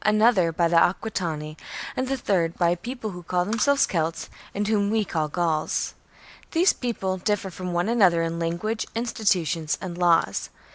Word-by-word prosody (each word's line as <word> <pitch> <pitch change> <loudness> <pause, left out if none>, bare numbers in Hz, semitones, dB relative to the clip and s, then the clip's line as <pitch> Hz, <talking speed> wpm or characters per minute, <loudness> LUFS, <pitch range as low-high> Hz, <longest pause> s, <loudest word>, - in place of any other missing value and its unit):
another 215 -4 +4
by 170 +1 +2
the 170 - 0
Aquitani, 165 -4 0 0.4
and 255 - -1
the 270 +1 -1
third 175 -8 0
by 170 -2 +3
a - - +2
people 230 +3 -6
who 180 -1 -8
call 180 +1 0
themselves 230 +7 +3
Celts 165 -1 -2 0.2
and 205 +1 -1
whom 205 -2 +2
we 215 -1 +1
call 160 -4 -1
Gauls.^ 160 -1 -1 0.6
These 350 +3 +4
peoples 190 -7 -3
differ 200 -1 -1
from 180 0 -5
one 175 +3 0
another 190 -8 +4
in 165 0 -2
language, 175 +7 -2
institutions, 180 - 0
and 180 -2 -6
laws. 170 - +2
180 Hz, 165 wpm, -25 LUFS, 170-215 Hz, 0.6 s, another